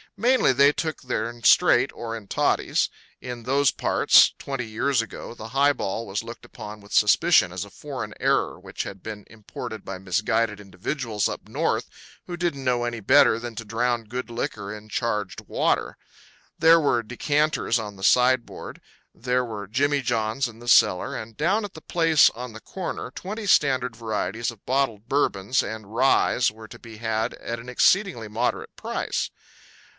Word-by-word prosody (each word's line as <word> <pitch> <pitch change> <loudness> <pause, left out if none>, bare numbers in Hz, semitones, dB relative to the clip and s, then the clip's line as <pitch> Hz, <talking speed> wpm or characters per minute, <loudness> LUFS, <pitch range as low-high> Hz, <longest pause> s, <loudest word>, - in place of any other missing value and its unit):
Mainly 250 - +3
they 140 +2 +5
took 160 0 -4
their'n 120 -1 -3
straight - - +5
or 115 -1 -5
in 105 -3 -12
toddies; - - +1 0.3
in 125 -2 -7
those 140 +3 +3
parts, - - +4
twenty 135 -3 -4
years 115 +3 0
ago, 115 +1 -8
the 110 -1 -9
high 140 +3 +3
ball 110 -1 -3
was 100 +3 -3
looked 115 +1 -9
upon 105 0 -9
with 100 0 -17
suspicion 105 -1 +4
as - - -4
a - - -14
foreign - - -7
error - - +1
which - - -6
had 100 -2 -9
been 105 -2 -7
imported 110 -1 -8
by 95 -1 -6
misguided 105 +3 0
individuals 105 +3 -3
up - - -7
North - - -1 0.4
who 175 - -5
didn't 170 -5 -2
know 125 -2 +1
any 120 -1 -3
better 120 +2 +5
than 120 -1 -7
to 115 - -5
drown 120 +1 -1
good 125 +3 -5
liquor 105 -3 -4
in 105 0 -11
charged 105 -3 -2
water. - - 0 0.6
There 165 +1 +6
were 125 -6 +1
decanters 145 +2 0
on 105 -3 -5
the 95 - -12
sideboard; 125 +2 +2 0.3
there 125 +1 -1
were 105 -4 -6
jimmy 140 +6 +1
johns 115 +1 0
in 115 -1 -12
the 120 - -12
cellar; 90 -6 +4
and 110 0 -8
down 190 +8 +1
at 205 - -6
the 160 - -11
place 165 -3 +4
on 125 0 -8
the 110 - -10
corner 175 -8 -5
twenty 210 +9 -6
standard 130 - +2
varieties 110 -1 -2
of 110 -3 -18
bottled 125 -5 0
Bourbons 125 -4 +1
and 110 -1 -7
ryes 125 -1 +3
were 110 0 -12
to - - -12
be 115 -2 -12
had 110 0 -2
at 115 0 -5
an 120 +2 -10
exceedingly 125 - +2
moderate 115 +4 -2
price. - - -3
115 Hz, 170 wpm, -24 LUFS, 110-135 Hz, 0.6 s, There